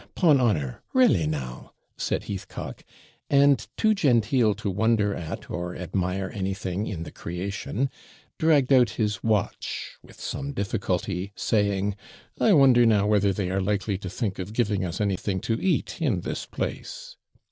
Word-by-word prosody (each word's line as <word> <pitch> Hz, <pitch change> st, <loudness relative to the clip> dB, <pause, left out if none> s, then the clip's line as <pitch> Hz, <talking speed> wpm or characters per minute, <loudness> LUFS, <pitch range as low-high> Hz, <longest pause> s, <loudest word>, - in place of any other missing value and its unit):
'Eh! -, -, -20 dB
'pon 150 Hz, -7 st, +5 dB
honour 75 Hz, -, 0 dB
re'lly 170 Hz, -, +4 dB
now!' 65 Hz, -5 st, -5 dB, 0.2 s
said -, -, -2 dB
Heathcock; 100 Hz, -3 st, -6 dB, 0.5 s
and, 140 Hz, -4 st, +4 dB
too 220 Hz, -1 st, +4 dB
genteel 120 Hz, -, +3 dB
to 100 Hz, -1 st, -3 dB
wonder 105 Hz, 0 st, +2 dB
at 80 Hz, -4 st, -6 dB
or 90 Hz, 0 st, -4 dB
admire 90 Hz, +1 st, -2 dB
anything 95 Hz, 0 st, -2 dB
in 85 Hz, -5 st, -4 dB
the 75 Hz, -, -8 dB
creation, 100 Hz, +8 st, -3 dB, 0.5 s
dragged 145 Hz, -4 st, +4 dB
out 125 Hz, -4 st, +6 dB
his 105 Hz, -3 st, -1 dB
watch 110 Hz, -3 st, -2 dB
with -, -, -17 dB
some 140 Hz, 0 st, -4 dB
difficulty, 100 Hz, -3 st, -2 dB
saying, 100 Hz, -2 st, +1 dB, 0.4 s
'I 220 Hz, -, +5 dB
wonder 130 Hz, -6 st, +6 dB
now 105 Hz, -3 st, +4 dB
whether 105 Hz, -1 st, +3 dB
they 95 Hz, -1 st, -2 dB
are 95 Hz, +1 st, 0 dB
likely 100 Hz, 0 st, -1 dB
to 95 Hz, -, -6 dB
think 95 Hz, 0 st, -3 dB
of 95 Hz, +3 st, -5 dB
giving 105 Hz, -5 st, +1 dB
us 90 Hz, 0 st, -3 dB
anything 100 Hz, -1 st, -1 dB
to 115 Hz, 0 st, -1 dB
eat 190 Hz, -, 0 dB
in -, -, +1 dB
this -, -, -4 dB
place?' -, -, -5 dB
100 Hz, 155 wpm, -26 LUFS, 95-120 Hz, 0.5 s, out